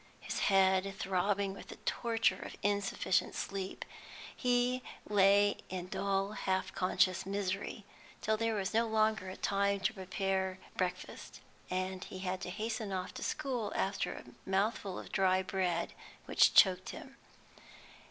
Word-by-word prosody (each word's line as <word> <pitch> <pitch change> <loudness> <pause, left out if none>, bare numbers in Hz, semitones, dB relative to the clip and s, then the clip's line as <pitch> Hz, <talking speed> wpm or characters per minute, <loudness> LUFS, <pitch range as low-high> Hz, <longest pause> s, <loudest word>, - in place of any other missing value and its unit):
His - - -4
head 190 0 +4
throbbing 195 +1 0
with - - -10
the - - -8
torture 225 -5 +1
of - - -7
insufficient 200 -2 +1
sleep, 195 -1 -4 0.5
he 250 0 +2 0.3
lay 205 0 +5
in 180 -1 -5
dull 195 +1 0
half 190 -3 -1
conscious 185 0 +2
misery 195 +1 -2 0.3
till 220 - +1
there 225 0 0
was 195 0 -2
no 230 +1 +3
longer 215 -4 +1
time 200 0 +1
to 195 +5 +1
prepare 190 -1 -1 0.2
breakfast, 185 0 -4 0.3
and 185 0 -2
he - - -8
had 185 0 -3
to - - -4
hasten 215 +2 -3
off 185 -1 -3
to - - -7
school 255 -8 -2
after 195 +1 0
a - - -12
mouthful 195 0 0
of - - -8
dry 190 -1 +3
bread 180 -3 -1 0.3
which - - +4
choked 185 -1 +6
him. 270 - -9
195 Hz, 140 wpm, -33 LUFS, 185-210 Hz, 0.5 s, choked